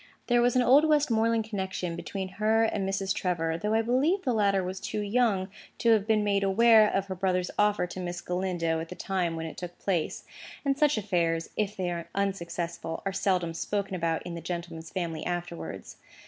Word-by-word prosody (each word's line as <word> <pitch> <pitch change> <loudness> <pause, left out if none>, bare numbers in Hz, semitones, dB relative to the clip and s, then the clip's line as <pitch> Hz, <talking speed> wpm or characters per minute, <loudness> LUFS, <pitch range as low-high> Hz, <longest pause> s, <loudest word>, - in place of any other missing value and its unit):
There 240 -1 +3
was 245 +1 +3
an 250 - +4
old 270 +5 +6
Westmoreland 230 -7 +2
connection 190 -5 -3
between 190 +2 -4
her 220 +1 +3
and 200 -3 0
Mrs. 195 0 0
Trevor, 165 -3 -1
though 210 +3 0
I 225 - +3
believe 285 - +2
the 250 - +1
latter 200 -3 +2
was 185 +1 -4
too 210 - -3
young 205 -3 +1 0.3
to 230 - +3
have 215 -2 +3
been 215 -2 +3
made 200 -1 +2
aware 220 +2 +6
of 195 0 0
her 190 - -4
brother's 180 -1 0
offer 210 -2 +3
to 180 +1 -7
Miss 175 -1 -4
Galindo 175 -3 -1
at 165 0 -6
the 180 - -7
time 180 -4 -1
when 165 0 -4
it 160 - -7
took 175 -1 -7
place; 180 -5 -1 0.4
and 275 -1 +2
such 295 -2 +3
affairs, 170 -5 0
if 210 -1 -1
they 180 -2 -1
are 170 -1 -5
unsuccessful, 170 -4 -3
are 195 - -1
seldom 180 -4 0
spoken 200 +3 -2
about 165 -2 -1
in 175 - -6
the 170 - -6
gentleman's 170 -1 -5
family 170 -4 -3
afterwards. 175 -1 -5
190 Hz, 200 wpm, -28 LUFS, 175-215 Hz, 0.4 s, old